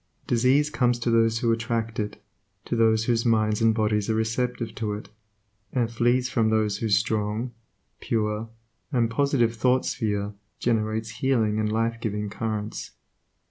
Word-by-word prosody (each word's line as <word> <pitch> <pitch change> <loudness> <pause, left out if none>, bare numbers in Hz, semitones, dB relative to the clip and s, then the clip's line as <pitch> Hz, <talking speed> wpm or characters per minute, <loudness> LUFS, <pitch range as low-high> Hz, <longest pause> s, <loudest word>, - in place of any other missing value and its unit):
Disease 130 +5 +3
comes 125 -4 +2
to 120 0 -1
those 115 0 +3
who 115 0 +1
attract 115 0 -1
it, 105 -1 -3 0.5
to - - -2
those 110 -1 +3
whose 115 -1 +1
minds 110 -2 +2
and 115 0 +5
bodies 105 -1 0
are 110 - +2
receptive 115 +1 -1
to 105 -2 -2
it, 105 - -7 0.6
and 120 -3 0
flees 120 +2 +2
from 115 -4 +1
those 105 -2 +1
whose 110 -3 +3
strong, 110 +2 -1 0.5
pure, 110 0 -1 0.4
and 120 -4 +1
positive 120 -2 +2
thought 125 +2 +2
sphere 105 -3 -2 0.2
generates 110 -1 0
healing 115 -6 +1
and 105 0 0
life 115 +1 0
giving 105 -2 -2
currents. 110 -1 -4
115 Hz, 150 wpm, -25 LUFS, 110-120 Hz, 0.6 s, and